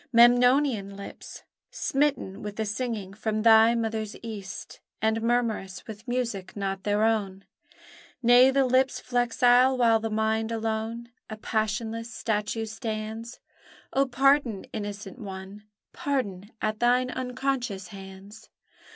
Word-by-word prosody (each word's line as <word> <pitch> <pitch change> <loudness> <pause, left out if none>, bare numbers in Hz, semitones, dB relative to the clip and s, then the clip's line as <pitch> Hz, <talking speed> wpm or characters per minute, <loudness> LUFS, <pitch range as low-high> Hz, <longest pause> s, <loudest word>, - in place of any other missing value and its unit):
Memnonian 245 -3 +4
lips! 200 - -10 0.3
Smitten 275 -9 -1
with 210 +1 -4
singing 210 -3 -3
from 215 +1 -2
thy 225 0 +7
mother's 220 -2 -2
east, 205 -4 -7 0.2
And 220 +1 +1
murmurous 230 -5 -1
with 220 +2 -10
music 230 -7 -3
not 195 -1 -2
their 205 +1 +2
own: 200 -4 0 0.8
Nay, 245 +2 +7
the 270 0 +3
lips 255 +1 +2
flexile, 245 +1 +3
while 230 -2 +4
the 225 0 -3
mind 220 +1 0
alone 225 +1 -3 0.2
A 215 - -6
passionless 220 +1 -2
statue 220 0 -2
stands. 220 +1 -5 0.5
Oh, 275 0 +3
pardon, 260 -4 +2
innocent 205 0 -6
one! 195 0 -8 0.3
Pardon 205 -9 -2
at 215 0 -1
thine 250 +1 +3
unconscious 250 -7 -3
hands! 195 +2 -12
225 Hz, 115 wpm, -27 LUFS, 210-245 Hz, 0.8 s, thy